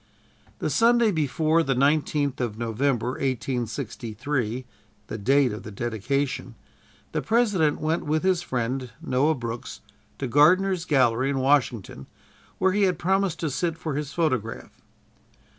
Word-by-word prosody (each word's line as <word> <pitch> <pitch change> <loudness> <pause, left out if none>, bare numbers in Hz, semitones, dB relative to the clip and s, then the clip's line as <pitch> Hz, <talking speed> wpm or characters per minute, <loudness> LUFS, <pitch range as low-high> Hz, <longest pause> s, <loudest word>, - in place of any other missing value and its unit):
The - - -2
Sunday 235 -1 +4
before 160 0 +1
the 135 -4 0
19th 145 0 +1
of 115 -4 -2
November, 120 +2 0
1863, 125 -1 -3 0.4
the 110 - -6
date 135 +4 +3
of 105 - -6
the - - -9
dedication, 120 +5 -2 0.6
the 155 - -1
President 205 -9 +2
went 160 +2 0
with 155 +2 +1
his 185 -2 +2
friend 125 -2 -2
Noah 150 0 +1
Brooks 115 -2 -6 0.4
to - - -3
Gardner's 175 +7 +4
gallery, 130 -4 +2
in 140 - -1
Washington, 130 -5 0 0.5
where 190 0 +3
he 205 +2 +1
had 185 -2 +1
promised 190 -2 0
to 160 -3 -1
sit 165 +3 -1
for 160 -2 -4
his 145 0 -3
photograph. 125 -9 -2
140 Hz, 135 wpm, -25 LUFS, 125-165 Hz, 0.6 s, Sunday